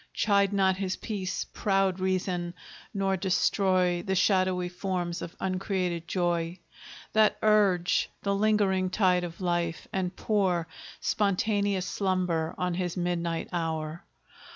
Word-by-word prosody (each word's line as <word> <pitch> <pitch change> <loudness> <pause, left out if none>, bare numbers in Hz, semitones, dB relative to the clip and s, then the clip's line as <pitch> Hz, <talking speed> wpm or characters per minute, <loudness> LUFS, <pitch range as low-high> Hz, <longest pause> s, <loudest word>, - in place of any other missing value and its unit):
Chide 200 -2 +3
not 190 -2 +2
his 190 -1 -2
peace, 195 -4 -3
proud 195 -2 +1
Reason; 185 -2 -1 0.4
nor 195 -1 0
destroy 185 -1 +2
The 190 -1 -1
shadowy 185 -2 +2
forms 180 -1 -3
of 170 - -7
uncreated 185 -3 -2
joy, 175 -1 0 0.6
That 215 -1 +4
urge 200 -5 +3
the 200 - +1
lingering 200 -3 +2
tide 180 -2 +2
of 170 +1 -7
life, 175 -2 -1
and 185 -1 -1
pour 185 -6 +1 0.3
Spontaneous 200 -1 +1
slumber 180 -5 -1
on 180 -1 -1
his 175 0 -2
midnight 170 -2 -1
hour. 160 -1 -3
185 Hz, 120 wpm, -28 LUFS, 175-195 Hz, 0.6 s, That